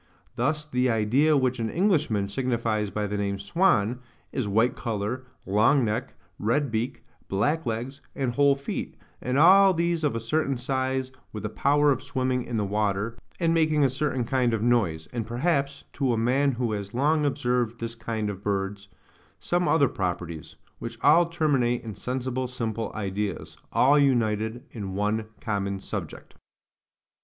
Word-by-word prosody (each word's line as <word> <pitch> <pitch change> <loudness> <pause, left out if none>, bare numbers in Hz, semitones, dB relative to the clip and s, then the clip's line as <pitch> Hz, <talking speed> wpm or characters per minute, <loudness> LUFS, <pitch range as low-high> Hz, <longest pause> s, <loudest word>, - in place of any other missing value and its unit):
Thus 150 +5 0
the 125 -3 +1
idea 125 +8 +3
which 130 -2 +1
an 115 -1 -1
Englishman 155 - +1
signifies 115 -2 -1
by 105 +1 -2
the 105 0 -3
name 100 -1 -1
swan, 110 - +2 0.3
is 130 -6 -2
white 110 +5 +2
colour, 115 +3 -3 0.2
long 115 +7 +3
neck, 105 0 -3 0.2
red 130 +5 +1
beak, 120 +4 -2 0.2
black 145 +10 0
legs, 120 +5 -3
and 130 -4 -1
whole 140 +1 +4
feet, 140 0 -5 0.3
and 125 +1 -1
all 190 +4 +7
these 170 -1 0
of 145 -6 +1
a - - -1
certain 135 +4 0
size, 130 +1 -1 0.2
with 105 0 -6
a - - -1
power 145 +3 +3
of 130 -2 0
swimming 130 -2 -1
in 120 - -3
the 105 - 0
water, 105 +2 -1 0.2
and 165 -2 +2
making 155 -2 +3
a 135 - +3
certain 135 -2 -1
kind 125 -1 +1
of 110 - -2
noise, 95 -10 +1
and 115 -3 -3
perhaps, 140 +2 0
to 135 -4 +1
a - - 0
man 130 +5 +2
who 120 -1 -1
has 100 0 -4
long 150 +4 +2
observed 125 -5 0
this 115 0 -4
kind 110 -2 -3
of 100 -2 -5
birds, 100 0 -2 0.5
some 175 0 0
other 145 -4 +4
properties: 85 - -4 0.2
which - - -6
all 170 +2 +6
terminate 140 -8 +1
in 110 -2 -6
sensible 130 +2 -3
simple 115 -3 -3
ideas, 100 -1 -3 0.2
all 145 +3 +5
united 115 -3 +1
in 100 -5 -6
one 105 +2 0
common 100 -3 -2
subject. - - -7
120 Hz, 165 wpm, -26 LUFS, 105-140 Hz, 0.5 s, all